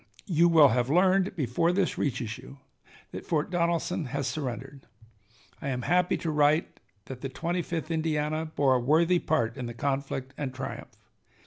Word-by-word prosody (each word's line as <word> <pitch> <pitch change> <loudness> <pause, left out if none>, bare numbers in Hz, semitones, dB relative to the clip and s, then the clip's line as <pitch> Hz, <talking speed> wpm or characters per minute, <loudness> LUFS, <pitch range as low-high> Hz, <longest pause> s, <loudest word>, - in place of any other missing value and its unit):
You 170 -2 +3
will 155 -4 +7
have 125 +1 0
learned 185 +4 +3
before 155 - +1
this 185 0 0
reaches 120 -5 -2
you 140 - -12 0.5
that - - -7
Fort 155 +1 -1
Donelson 170 -2 0
has 140 +1 -3
surrendered. 135 -1 -5 0.7
I 140 - -3
am 125 -2 -2
happy 180 +5 +2
to 165 - -3
write 150 +2 +2 0.3
that 130 -1 -8
the 135 - -4
Twenty 170 +6 -2
fifth 165 -1 -4
Indiana 155 -1 -1
bore 140 -4 +2
a 125 - +3
worthy 165 +8 +3
part 120 -9 0
in 125 -2 -4
the 120 - -7
conflict 135 0 -3
and 135 -3 -4
triumph. 130 - -6
150 Hz, 165 wpm, -28 LUFS, 130-170 Hz, 0.7 s, will